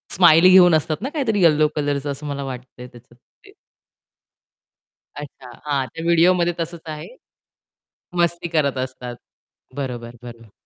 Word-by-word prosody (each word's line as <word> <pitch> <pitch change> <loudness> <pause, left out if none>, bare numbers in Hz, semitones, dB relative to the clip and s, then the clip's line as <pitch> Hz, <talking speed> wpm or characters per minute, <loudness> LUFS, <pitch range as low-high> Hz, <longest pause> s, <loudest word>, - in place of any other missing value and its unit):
Smiley 170 0 +6
घेऊन 180 -3 +7
असतात 155 +1 -1
ना, 260 - -3
काहीतरी 255 -10 -1
येलो 155 -2 +4
कलरचं 145 -1 -2
असं 140 +2 -8
मला 140 -1 -4
वाटतंय 125 -1 -9
त्याच्यात. 120 0 -19 0.3
ते - - -16 1.6
अच्छा, 135 -3 -10
हां 140 -3 -1
त्या 165 - -9
व्हिडिओमध्ये 170 +1 +3
तसच 165 0 -5
आहे. 155 -1 -7 1.1
मस्ती 170 0 -1
करत 140 -3 +1
असतात, 130 -1 -6 0.6
बरोबर, 120 -4 -6
बरोबर. 115 -3 -12
150 Hz, 130 wpm, -21 LUFS, 130-170 Hz, 1.6 s, घेऊन